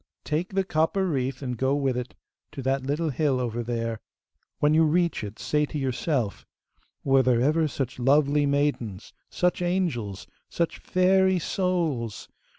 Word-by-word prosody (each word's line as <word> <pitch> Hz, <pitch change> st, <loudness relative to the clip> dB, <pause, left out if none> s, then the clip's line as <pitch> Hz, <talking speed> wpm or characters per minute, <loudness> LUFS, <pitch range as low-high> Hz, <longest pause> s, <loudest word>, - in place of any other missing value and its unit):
'Take 165 Hz, +5 st, -2 dB
the 195 Hz, -, +3 dB
copper 170 Hz, +3 st, +1 dB
wreath, 135 Hz, -3 st, -2 dB
and 125 Hz, -3 st, -4 dB
go 135 Hz, +1 st, +2 dB
with 135 Hz, -3 st, 0 dB
it 125 Hz, 0 st, -5 dB, 0.4 s
to 135 Hz, -, -6 dB
that 135 Hz, +1 st, +1 dB
little 150 Hz, +4 st, -1 dB
hill 140 Hz, -2 st, +1 dB
over 120 Hz, -1 st, -2 dB
there. 115 Hz, -1 st, -3 dB, 0.6 s
When 150 Hz, +1 st, +3 dB
you 160 Hz, +1 st, +5 dB
reach 170 Hz, -3 st, +1 dB
it, 105 Hz, +2 st, -7 dB
say 150 Hz, 0 st, 0 dB
to 150 Hz, -, -5 dB
yourself, 130 Hz, -4 st, -1 dB, 0.6 s
"Were 135 Hz, -1 st, +4 dB
there 125 Hz, -2 st, +3 dB
ever 155 Hz, +5 st, +2 dB
such 130 Hz, -3 st, -4 dB
lovely 145 Hz, +2 st, +3 dB
maidens! 140 Hz, -8 st, -1 dB, 0.2 s
such 180 Hz, 0 st, 0 dB
angels! 165 Hz, -, -1 dB, 0.2 s
such 170 Hz, -1 st, -2 dB
fairy 190 Hz, 0 st, +3 dB
souls!" 165 Hz, -, -1 dB
140 Hz, 155 wpm, -26 LUFS, 125-165 Hz, 0.6 s, you